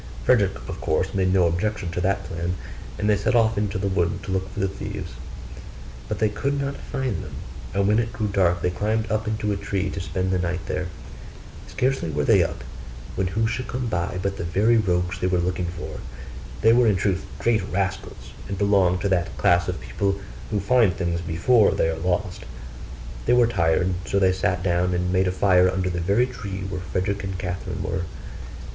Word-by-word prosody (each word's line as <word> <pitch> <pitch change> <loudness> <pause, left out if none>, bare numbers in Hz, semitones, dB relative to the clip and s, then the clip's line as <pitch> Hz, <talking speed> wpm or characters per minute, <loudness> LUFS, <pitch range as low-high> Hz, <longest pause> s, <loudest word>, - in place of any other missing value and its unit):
Frederick - - +4
of - - -6
course 80 +4 0
made 95 -2 +2
no 95 -2 +4
objection 90 +2 -1
to 90 - -2
that 95 +1 +1
plan, 85 +2 -3 0.4
and 105 - -1
they 105 - +5
set 100 +4 +1
off 115 -1 +4
into 100 -2 -1
the 100 +1 -1
wood 90 -1 0
to 95 - -5
look 95 0 -1
for - - -7
the 95 - +2
thieves; 95 - -6 1.0
but 105 - -2
they 110 - +3
could 140 +7 -1
not 140 0 -2
find 130 -8 -3
them: - - -9 0.4
and 100 0 +2
when 105 +2 +4
it 115 -1 -1
grew 110 - -3
dark, 90 -4 +2
they 90 - +2
climbed 110 +4 -1
up 110 0 0
into 105 -1 -1
a - - 0
tree 100 -1 -2
to 95 - -4
spend 95 +1 -2
the 95 - +1
night 90 0 -2
there. - - -2 0.8
Scarcely 130 -9 0
were 75 -1 -1
they - - +5
up, - - -4 0.5
than 95 -1 0
who 110 +5 0
should 120 +3 -2
come 125 0 -3
by 90 -4 -1
but 100 0 -1
the - - -3
very 100 +8 +3
rogues 90 -5 +1
they 90 - 0
were 90 -1 +2
looking 90 0 -1
for. 85 -2 -6 0.6
They 110 +1 +6
were 120 0 +5
in 105 - +4
truth 95 -1 0
great 115 -3 +2
rascals, 95 0 -3 0.2
and 100 - -4
belonged 95 -3 +3
to 100 - 0
that 90 -2 0
class 85 0 +3
of 90 -2 -2
people 95 +11 -1 0.3
who 105 - 0
find 110 -1 +3
things 85 -2 -1
before 90 +8 +3
they - - +2
are 80 - -2
lost; 90 +2 -1 0.8
they - - +5
were 125 -1 +6
tired; 90 -4 +2
so 100 - 0
they 95 -1 +4
sat 90 -1 0
down 90 0 +1
and 90 +1 0
made 95 0 +3
a - - +2
fire 95 -1 +4
under 90 0 -1
the 85 0 -2
very 100 +8 +3
tree 100 -6 -6
where 95 -2 -4
Frederick 100 +2 -2
and 95 -1 -3
Catherine 90 -1 -4
were. 90 - -2
95 Hz, 210 wpm, -24 LUFS, 90-105 Hz, 1.0 s, They